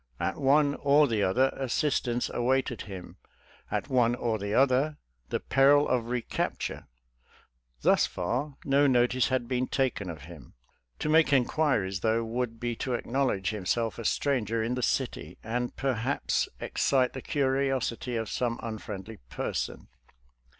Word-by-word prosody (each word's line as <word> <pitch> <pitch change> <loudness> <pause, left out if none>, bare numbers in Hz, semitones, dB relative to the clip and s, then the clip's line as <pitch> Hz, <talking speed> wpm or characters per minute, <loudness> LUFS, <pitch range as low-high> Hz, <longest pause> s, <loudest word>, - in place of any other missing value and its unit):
At 95 - -2
one 140 +1 +4
or: 145 +1 +5
the 110 -4 0
other, 125 +8 +3
assistance 130 -2 0
awaited 125 0 0
him— 95 -2 -9 0.5
at - - -2
one 120 -3 +3
or 115 -3 -1
the 100 +1 -4
other, 135 +5 +3 0.3
the - - -1
peril 140 +2 +4
of 120 -2 0
recapture. 125 -1 -3 1.0
Thus - - +4
far, 130 +11 -3
no 140 +1 +4
notice 125 0 +3
had 130 -2 -1
been 125 0 0
taken 110 -8 -1
of 80 -4 -8
him; 80 -6 -13 0.4
Td 155 - -1
make 160 -1 +5
inquiries, 125 -8 +2
though, 115 +2 +1
would 115 0 -3
be 120 0 -2
to 125 -2 -1
acknowledge 120 -6 0
himself 110 +3 -1
a 115 - -6
stranger 115 -5 0
in 115 +2 -1
the 125 - -2
city,' 130 0 -2
and 120 +2 -2
perhaps 130 0 0
ex - - -4
citC' 130 -2 +3
the 130 - -6
curiosity 135 -3 0
of 110 -1 -2
some 115 +4 -2
unfriendly 110 -2 -6
person. - - -4
125 Hz, 145 wpm, -28 LUFS, 110-135 Hz, 1.0 s, or